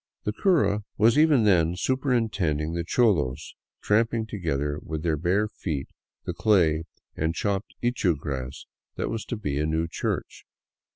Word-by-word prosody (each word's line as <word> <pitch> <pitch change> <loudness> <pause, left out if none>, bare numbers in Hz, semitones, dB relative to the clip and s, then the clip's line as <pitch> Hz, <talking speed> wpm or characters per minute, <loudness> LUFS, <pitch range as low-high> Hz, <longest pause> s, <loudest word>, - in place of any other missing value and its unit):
The 105 - -1
cura 145 - +2
was 110 +3 +5
even 150 -5 +5
then 90 -5 +3
superintending 105 - 0
the 85 0 -2
cholos 85 - +1 0.3
tramp 115 +3 +2
ing 110 -1 -1
together 75 -8 -2
with 80 -1 -5
their 80 -2 +1
bare 90 +7 +1
feet 75 -9 -4 0.4
the - - -2
clay 85 -7 +3 0.3
and 80 +1 -1
chopped 100 +1 -2
ichu 110 - +1
grass 65 -2 -5 0.3
that - - -2
was 115 -1 -4
to 120 - -4
be 75 -9 -2
a 75 - 0
new 80 +1 0
church. - - -4
90 Hz, 155 wpm, -26 LUFS, 80-110 Hz, 0.4 s, was